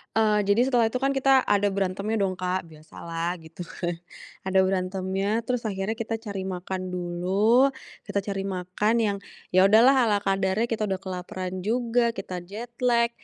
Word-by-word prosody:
Eee, 210 -2 +3
jadi 225 +6 +3
setelah 240 -3 +3
itu 255 - -1
kan 275 - +2
kita 270 -1 +4
ada 205 -3 +1
berantemnya 200 +3 -1
dong 190 -1 0
Kak, 180 -1 -2
biasalah 165 +2 -5
gitu 165 +2 -9
kan. 175 0 -4 0.5
Ada 190 0 +3
berantemnya 190 +3 0
terus 240 0 -3
akhirnya 200 +2 -2
kita 225 -1 -3
cari 200 -4 -5
makan 185 0 -4
dulu. 195 +9 +2 0.3
Kita 200 - -1
cari 195 -1 -4
makan 190 +3 -1
yang, 205 -2 0 0.3
ya 185 +1 +5
udahlah 240 +5 +6
ala 205 -2 +2
kadarnya 195 +3 0
kita 220 -2 -1
udah 190 -2 -2
kelaparan 185 0 -5
juga, 235 0 +1
kita 180 -5 -6
jet 215 +6 -7 0.2
lag, 235 -1 +4
195 Hz, 165 wpm, -26 LUFS, 185-225 Hz, 0.5 s, udahlah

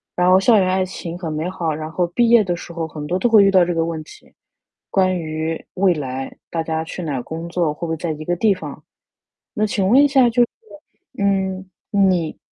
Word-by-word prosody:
然 180 0 +3
后 185 +1 +6
校 220 +2 +4
园 185 - +2
爱 185 0 +1
情 175 -2 -7
很 170 -3 -5
美 155 +4 -2
好， 170 -4 -2
然 155 +1 -6
后 175 +1 0
毕 235 +7 +1
业 235 -2 +6
的 175 -3 -1
时 170 0 -9
候 165 -1 -3
很 150 -2 -7
多 180 +4 -1
都 240 - +2
会 220 -3 +7
遇 195 - +4
到 185 -2 +5
这 175 0 -1
个 165 0 +1
问 165 -2 -4
题。 - - -17 0.6
关 185 -1 +2
于 160 0 -4
未 185 -1 +3
来， 135 -3 -5
大 165 -1 -2
家 160 0 -2
去 175 +2 -7
哪 140 -6 -2
工 165 +6 -6
作， 170 -3 0
会 150 - -22
不 - - -5
会 160 - -2
在 165 0 -3
一 155 0 -6
个 175 - 0
地 205 +3 +3
方？ 185 - -9 0.7
那 215 -3 +1
请 200 -2 -1
问 260 +7 +6
一 - - +6
下 270 -3 +4
就 240 +1 +3
是， 240 - +2 0.7
嗯， 190 -1 0 0.2
你 185 -5 +1
175 Hz, 255 characters per minute, -20 LUFS, 160-195 Hz, 0.7 s, 会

